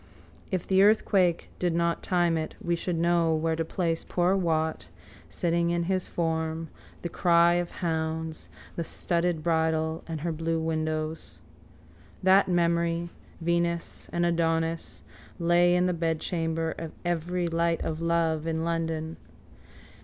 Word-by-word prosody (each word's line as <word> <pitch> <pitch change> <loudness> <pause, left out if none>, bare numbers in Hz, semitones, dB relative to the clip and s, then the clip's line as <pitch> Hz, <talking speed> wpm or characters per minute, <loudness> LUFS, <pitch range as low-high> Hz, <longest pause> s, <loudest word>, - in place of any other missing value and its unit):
_ - - -26 0.5
If 185 -3 -2
the 190 0 +3
earthquake 195 -4 +3
did 175 -2 0
not 170 0 +1
time 175 -2 +2
it 160 -1 -3
we 170 0 0
should 170 0 -2
know 170 -1 +2
where 160 +1 0
to 165 - -1
place 165 -1 -1
poor 180 +2 +1
Wat, 160 -4 0 0.4
sitting 170 0 0
in 170 0 0
his 185 +1 -1
form, 160 -1 -2 0.3
the - - -1
cry 170 0 +4
of 175 - -5
hounds, 160 -1 -3 0.3
the 170 - -2
studded 170 -1 -1
bridle 160 -1 +1
and 160 -3 -4
her 170 +1 -1
blue 165 +1 -1
windows. 155 0 -3 0.9
That 190 +1 +5
memory, 170 -1 +1 0.3
Venus 170 0 -1
and 175 0 +1
Adonis, 165 -1 0 0.3
lay 175 +1 +4
in 180 0 +3
the 180 - +1
bedchamber 165 0 -1
of 165 -1 -6
every 175 +1 -1
light 165 0 0
of 160 0 -3
love 165 -1 +1
in 160 0 -1
London. 165 -1 -2
170 Hz, 140 wpm, -27 LUFS, 160-175 Hz, 0.9 s, That